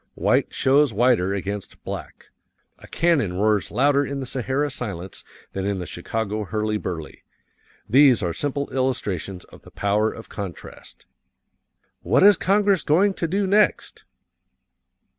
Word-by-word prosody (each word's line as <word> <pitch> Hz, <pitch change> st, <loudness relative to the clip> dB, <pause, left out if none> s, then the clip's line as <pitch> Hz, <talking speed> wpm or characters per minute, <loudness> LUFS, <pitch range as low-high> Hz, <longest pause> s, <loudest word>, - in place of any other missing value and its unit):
White -, -, +1 dB
shows 140 Hz, 0 st, +3 dB
whiter 115 Hz, -5 st, +3 dB
against 100 Hz, +1 st, -6 dB
black; -, -, -8 dB, 0.5 s
a -, -, -14 dB
cannon 160 Hz, -, +1 dB
roars 105 Hz, +1 st, +1 dB
louder 140 Hz, +4 st, +2 dB
in 140 Hz, 0 st, -4 dB
the 135 Hz, -, -4 dB
Sahara 135 Hz, +3 st, -2 dB
silence 95 Hz, -8 st, -6 dB, 0.3 s
than 95 Hz, 0 st, -3 dB
in 100 Hz, -1 st, -1 dB
the 90 Hz, -, -5 dB
Chicago 105 Hz, +4 st, -3 dB
hurly 105 Hz, +1 st, -2 dB
burly 85 Hz, -6 st, -6 dB, 0.7 s
these 130 Hz, -2 st, +5 dB
are 85 Hz, -2 st, -1 dB
simple 140 Hz, -, -2 dB
illustrations 100 Hz, -9 st, -2 dB
of -, -, -17 dB
the -, -, -15 dB
power 105 Hz, +2 st, 0 dB
of 115 Hz, -, -11 dB
contrast. 100 Hz, -4 st, -9 dB, 1.0 s
"What -, -, +2 dB
is 205 Hz, 0 st, +8 dB
Congress 200 Hz, -2 st, +2 dB
going 190 Hz, +7 st, +3 dB
to 170 Hz, -, -3 dB
do 195 Hz, +4 st, 0 dB
next? 205 Hz, +2 st, +1 dB
120 Hz, 140 wpm, -23 LUFS, 100-145 Hz, 1.0 s, is